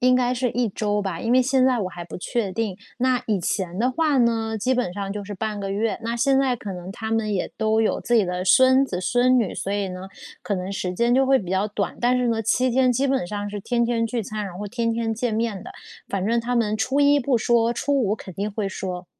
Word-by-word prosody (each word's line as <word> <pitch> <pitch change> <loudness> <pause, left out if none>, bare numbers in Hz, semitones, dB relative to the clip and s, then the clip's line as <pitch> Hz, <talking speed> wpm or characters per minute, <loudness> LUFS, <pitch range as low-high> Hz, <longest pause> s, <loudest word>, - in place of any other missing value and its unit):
应 255 0 +4
该 250 0 +1
是 250 0 0
1 240 -1 0
周 205 +1 -1
吧， 190 -5 -3
因 230 - 0
为 255 - +6
现 260 0 +2
在 255 -2 +3
我 190 - -1
还 175 -1 -8
不 175 - -8
确 200 0 -2
定。 215 -4 -2 0.2
那 255 0 +1
以 205 -4 0
前 180 +1 -2
的 250 +3 +2
话 295 0 +1
呢， 225 -2 +1
基 255 +5 +1
本 245 -8 -1
上 195 0 -4
就 205 0 -5
是 205 - -7
半 210 +1 -3
个 195 -1 -4
月， 215 +3 -1
那 230 +1 -2
现 270 +3 +2
在 265 -2 +2
可 205 -3 -6
能 180 +2 -7
她 220 0 -5
们 225 -1 0
也 190 - -2
都 220 0 +2
有 220 - +1
自 240 - 0
己 220 - +5
的 180 0 -3
孙 260 +7 +5
子 180 -8 -4
孙 245 +7 +3
女， 220 -6 -1
所 195 - -3
以 205 -1 -1
呢， 185 +1 -7 0.3
可 205 - -1
能 185 +1 -4
时 185 -2 -3
间 235 +5 +2
就 265 +1 +4
会 270 0 +4
比 185 -6 -6
较 190 +2 +1
短， 205 -1 -3
但 250 +1 +3
是 245 -1 +1
呢， 225 -1 0
7 255 +4 +2
天 255 0 +3
基 270 +4 +1
本 265 -9 0
上 205 +2 -4
是 205 0 -5
天 240 +3 0
天 230 -1 0
聚 230 0 -2
餐， 215 +1 -4
然 185 -2 -7
后 205 - -4
天 230 +1 -1
天 225 -1 -1
见 235 +1 -2
面 215 -3 -2
的。 - - -9 0.4
反 195 -1 -2
正 230 +2 +2
他 240 +1 -1
们 215 -3 +1
初 260 +6 0
一 285 0 +5
不 260 -2 +1
说， 235 0 +2
初 285 +4 -1
五 210 -4 +1
肯 190 -4 -10
定 205 +3 -2
会 205 -1 -2
说。 180 -1 -5
225 Hz, 280 characters per minute, -23 LUFS, 200-245 Hz, 0.4 s, 为